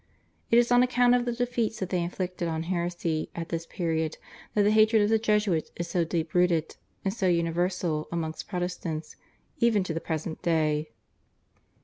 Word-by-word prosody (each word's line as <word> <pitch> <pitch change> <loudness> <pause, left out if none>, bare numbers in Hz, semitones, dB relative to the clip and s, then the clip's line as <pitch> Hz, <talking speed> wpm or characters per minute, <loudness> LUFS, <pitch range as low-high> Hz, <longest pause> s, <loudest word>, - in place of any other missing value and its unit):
It 230 - +5
is 240 0 +4
on 245 0 +6
account 250 -1 +4
of 245 -1 +2
the 240 - 0
defeats 235 -2 -1
that 190 - -4
they 180 -2 +1
inflicted 180 0 -3
on 160 -1 -2
heresy 170 -2 -2
at 165 -1 -5
this 165 0 -3
period 160 -2 -2 0.4
that 210 - +4
the 205 - +4
hatred 215 0 +5
of 205 - +2
the 225 0 +3
Jesuits 210 -6 +1
is 170 - -4
so 175 -2 +1
deep 165 -1 -2
rooted 175 -3 +2 0.3
and 195 - +1
so 200 -4 0
universal 170 -1 0
amongst 160 -2 -3
Protestants 175 -4 -4 0.4
even 225 -4 +3
to 180 - -3
the 165 - -3
present 160 0 -4
day. 155 -2 +1
175 Hz, 175 wpm, -27 LUFS, 165-210 Hz, 0.4 s, on